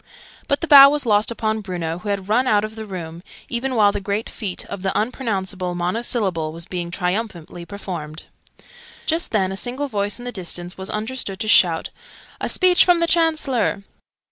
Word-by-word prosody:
But 280 - 0
the 335 - -2
bow 275 -2 +10
was 290 -1 -1
lost 210 -1 +3
upon 220 -2 -2
Bruno, 175 -4 -4
who 205 - -6
had 195 -2 -2
run 245 +5 +2
out 210 -3 +3
of 215 - -8
the 220 -1 -7
room, 170 -3 -7 0.3
even 255 +2 -2
while 205 -3 +5
the 200 - -4
great 200 +3 -3
feat 195 -4 -4
of 195 - -7
The 190 0 -1
Unpronounceable 195 -6 -3
Monosyllable 180 -3 -1
was 165 +1 -6
being 175 -2 -5
triumphantly 180 -2 -4
performed. 170 -6 -7 0.8
Just 325 +2 0
then, 190 -4 0
a - - -4
single 255 +7 -2
voice 205 -4 -2
in 245 - -10
the 245 - -4
distance 180 -3 -3
was 190 0 -7
understood 215 -2 -3
to 215 - -2
shout 175 -6 +3 0.5
"A - - -1
speech 365 -1 +5
from 355 -1 +4
the 335 - +2
Chancellor!" 310 -11 +1
205 Hz, 185 wpm, -21 LUFS, 180-245 Hz, 0.8 s, bow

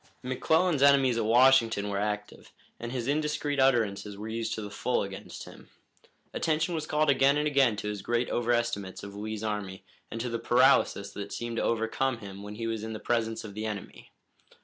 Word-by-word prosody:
McClellan's 160 +5 +1
enemies 135 -4 +5
at 110 - 0
Washington 115 -3 +4
were 100 -1 -2
active, 105 0 -4 0.3
and 120 0 -5
his 125 -2 -3
indiscreet 150 0 -1
utterances 110 -6 +1
were 105 +2 -6
used 115 0 -3
to 110 - -5
the 105 - -7
full 125 +4 0
against 95 -1 -8
him. - - -14 0.6
Attention 160 +2 0
was 155 -2 -3
called 150 -1 +2
again 135 +1 +4
and 150 - 0
again 135 -6 +3
to 105 - -5
his 105 -2 -4
great 120 +3 0
overestimates 120 -6 -1
of 100 0 -8
Lee's 110 +1 -5
army 105 -3 -4 0.3
and 115 - -6
to 120 - -2
the 115 - -2
paralysis 120 -5 +3
that 100 0 -7
seemed 120 -1 -4
to - - +1
overcome 115 +3 0
him 100 -3 -9
when 105 +1 -8
he 115 +1 -4
was 115 -1 -3
in 110 0 -5
the 110 - -6
presence 115 -1 -1
of 105 -2 -8
the 110 +2 -4
enemy. 105 -3 -7
115 Hz, 195 wpm, -28 LUFS, 105-135 Hz, 0.6 s, enemies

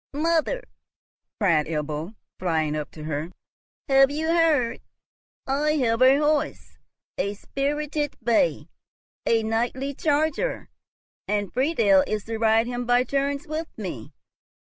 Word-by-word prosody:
"Mother," 335 +11 +1 0.8
cried 165 -8 +3
Ebbo, 155 +4 -4 0.2
flying 160 -4 0
up 150 -1 -4
to 155 - -11
her, 155 +1 -3 0.6
"have 270 0 +6
you 310 +3 -2
heard? 320 -8 +2 0.6
I 290 +3 +1
have 240 -5 +1
a 260 +2 +7
horse! 300 0 -1 0.4
a 200 +1 -1
spirited 295 +5 -2
bay, 235 - +2 0.6
a 225 -1 +3
knightly 240 +5 -1
charger, 315 - 0 0.6
and 205 -2 -1
Friedel 230 - +3
is 215 -1 -2
to 225 0 -5
ride 225 0 +3
him 245 0 -4
by 245 0 +4
turns 280 +1 -1
with 310 +2 -4
me. 160 - -6
245 Hz, 125 wpm, -25 LUFS, 205-295 Hz, 0.8 s, a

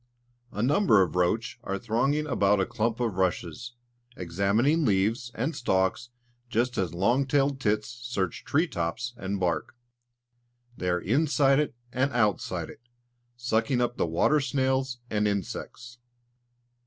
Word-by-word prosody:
A 105 - -2
number 130 - +4
of 90 - -4
roach 105 +7 0
are 100 -3 -2
thronging 130 +8 0
about 105 -8 +2
a 95 - +2
clump 115 0 -1
of 115 -6 -1
rushes, 95 +6 -2 0.4
examining 100 - +1
leaves 110 +2 +1
and 135 +8 -2
stalks 95 0 0 0.4
just 120 +1 0
as 90 -3 -2
long 120 +9 +2
tailed 140 0 +1
tits 105 -2 0
search 100 -8 -3
tree 155 +4 +2
tops 85 - -3
and 100 -3 -4
bark; 90 +2 -1 1.0
they 90 - -2
are 90 0 +1
inside 135 - +3
it 150 -4 -1 0.2
and 135 +3 +1
outside 110 -4 0
it, - - -16 0.6
sucking 120 +1 0
up 120 0 0
the - - +1
water 85 - +3
snails 130 -1 0
and 105 0 +1
insects. 120 +5 -5
115 Hz, 140 wpm, -27 LUFS, 100-130 Hz, 1.0 s, number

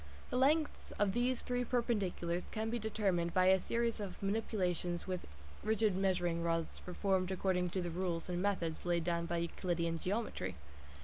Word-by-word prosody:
The - - -1
lengths 295 +4 +2
of 200 -2 +2
these 245 +1 +1
three 245 0 0
perpendiculars 200 -8 0
can 220 +1 -2
be 240 - 0
determined 195 -6 0
by 185 0 +6
a 190 0 +6
series 230 +4 0
of 200 -3 -5
manipulations 185 -4 0
with 185 -2 -3 0.4
rigid 215 -2 +2
measuring 180 -3 +1
rods 165 -1 -1
performed 185 0 0
according 185 -1 +1
to 185 +1 -1
the 175 - -3
rules 175 -1 -2
and 180 -1 -1
methods 180 -5 0
laid 175 -1 +1
down 170 0 0
by 170 - -1
Euclidean 170 -1 -1
geometry. 210 +6 -2
185 Hz, 165 wpm, -36 LUFS, 175-220 Hz, 0.4 s, by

